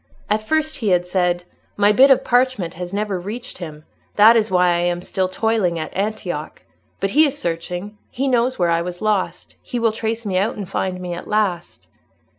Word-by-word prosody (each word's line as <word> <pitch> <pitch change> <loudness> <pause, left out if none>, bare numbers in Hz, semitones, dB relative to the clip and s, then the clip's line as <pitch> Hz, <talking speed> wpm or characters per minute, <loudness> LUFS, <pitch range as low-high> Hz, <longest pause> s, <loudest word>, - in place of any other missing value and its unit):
At 215 +1 +2
first 315 +6 0
he 225 - -3
had 180 -1 +3
said, 180 -1 0 0.3
"My 205 0 +5
bit 260 +6 +6
of 270 - +5
parchment 245 -8 +1
has 175 +1 -6
never 200 -2 -2
reached 210 +7 -7
him; 155 -3 -8 0.3
that 220 +3 +7
is 220 -1 +2
why 180 -1 +3
I 175 0 +2
am 175 0 -1
still 185 0 -1
toiling 205 -4 0
at 155 -1 -5
Antioch. 195 -6 -3 0.4
But 195 0 -1
he 305 +5 +5
is 285 0 -4
searching; 180 - -4
he 270 +3 -2
knows 255 0 +1
where 175 -2 +2
I 165 0 +2
was 175 0 -5
lost: 210 -3 -1
he 245 - -5
will 230 -1 +2
trace 225 +1 -3
me 185 -2 +1
out, 205 +3 0
and 200 -3 -6
find 185 -1 -2
me 180 -1 -5
at 170 - -7
last." 200 -5 -1
195 Hz, 205 wpm, -20 LUFS, 175-225 Hz, 0.4 s, that